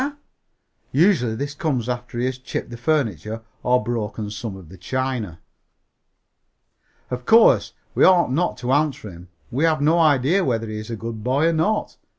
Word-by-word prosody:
Usually 140 - +3
this 140 +4 -4
comes 140 -6 -2
after 120 -1 -4
he 120 - 0
has 130 0 -3
chipped 130 -1 -5
the - - -6
furniture 115 - -1 0.2
or 125 -2 +2
broken 110 -2 -3
some 105 0 -5
of 90 -5 -13
the 95 - -12
china. 120 -5 -3 1.7
Of 125 0 -5
course, 230 +1 +5 0.2
we - - +2
ought 175 -7 +5
not 170 +7 0
to 125 0 -3
answer 140 -7 0
him. 85 +1 -13 0.2
We 135 +6 -1
have 160 -1 +2
no 155 +4 +3
idea 155 +4 +3
whether 115 -6 -1
he 110 0 -5
is 110 - -8
a 115 - -3
good 115 -1 -6
boy 140 +7 +2
or - - 0
not. 165 +7 0
125 Hz, 170 wpm, -22 LUFS, 110-150 Hz, 1.7 s, course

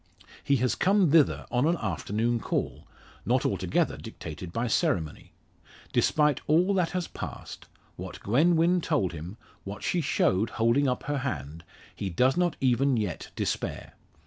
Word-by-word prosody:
He 140 - +2
has 125 -1 +1
come 190 -4 +3
thither 155 -3 +4
on 125 +4 +2
an 170 +1 +2
afternoon 110 - -1
call, - - -3 0.4
not - - +1
altogether - - 0
dictated 85 +2 -8
by 115 +6 -1
ceremony. 85 -8 -1 0.6
Despite 150 -3 +2
all 175 +6 +3
that 180 -3 +1
has 180 -2 -3
passed - - -8 0.3
what - - -7
Gwen 150 - +3
Wynn 170 +2 +3
told 135 - 0
him, 85 +6 -8 0.3
what 100 +1 -7
she 175 - 0
showed 105 - +1
holding 115 +5 +3
up 125 -1 -1
her 145 -1 -2
hand 80 - -5 0.3
he 100 - -3
does 125 +10 +2
not 175 -2 +1
even 130 0 +2
yet 105 -5 -3
despair. - - -3
125 Hz, 150 wpm, -27 LUFS, 100-160 Hz, 0.6 s, thither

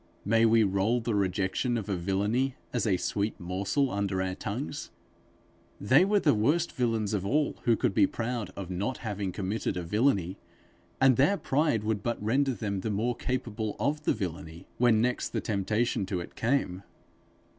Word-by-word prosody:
May 115 +2 +4
we 115 0 +5
roll 100 +4 +1
the 115 -1 -2
rejection 100 +5 0
of 105 - -4
a 100 - -1
villainy 105 +9 0 0.2
as 120 -2 0
a 95 -3 +3
sweet 105 +3 -2
morsel 100 +10 -1
under 100 -2 -1
our 95 0 -1
tongues? 120 +9 -5 0.9
They 130 - +5
were 205 +1 +3
the 150 -6 +3
worst 145 +11 +1
villains 115 -4 0
of 100 -3 0
all 145 +9 0
who 120 -2 +4
could 100 - 0
be - - +4
proud 120 -2 -3
of 95 -2 -6
not 100 +8 -2
having 100 -3 -2
committed 100 +1 -2
a 90 - -3
villainy; 100 -1 +1 0.6
and 130 -3 +5
their 195 +10 +4
pride 140 - +1
would 110 -1 -1
but 120 +2 -2
render 130 +5 +1
them 100 -2 -3
the 110 - -3
more 115 +4 0
capable 115 -5 -3
of 150 +1 -1
the - - +3
villainy, 85 -3 -6
when 120 -3 +4
next 125 +1 0
the - - 0
temptation 105 0 -1
to 95 -2 -2
it 85 - -8
came. 115 -7 0
110 Hz, 175 wpm, -29 LUFS, 100-125 Hz, 0.9 s, we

